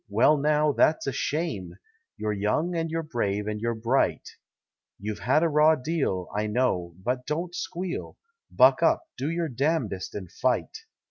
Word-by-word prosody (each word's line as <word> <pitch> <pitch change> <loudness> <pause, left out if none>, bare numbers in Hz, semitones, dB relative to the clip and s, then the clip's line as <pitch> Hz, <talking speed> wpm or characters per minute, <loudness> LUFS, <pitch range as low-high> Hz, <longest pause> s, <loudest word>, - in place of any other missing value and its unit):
Well 115 +9 +4
now, 150 +1 +2
that's 155 +3 +2
a 135 - 0
shame! 140 - -3 0.4
You're 105 -1 -1
young 105 - 0
and 165 -1 -1
you're 165 +1 -2
brave 105 -8 -2
and 105 0 -3
you're 115 0 -1
bright. 115 +4 0 0.7
You've 105 +2 -5
had 140 +6 +2
a - - +4
raw 155 +1 +5
deal, 130 - -2
I 105 +1 0
know, 100 -7 0
but 125 +2 -2
don't 170 +4 -2
squeal. 180 0 -5 0.3
Buck - - +5
up, - - +3
do 140 - -2
your 165 0 -1
damnedest 130 - -1
and 95 -4 -6
fight! - - 0
130 Hz, 160 wpm, -26 LUFS, 105-160 Hz, 0.7 s, raw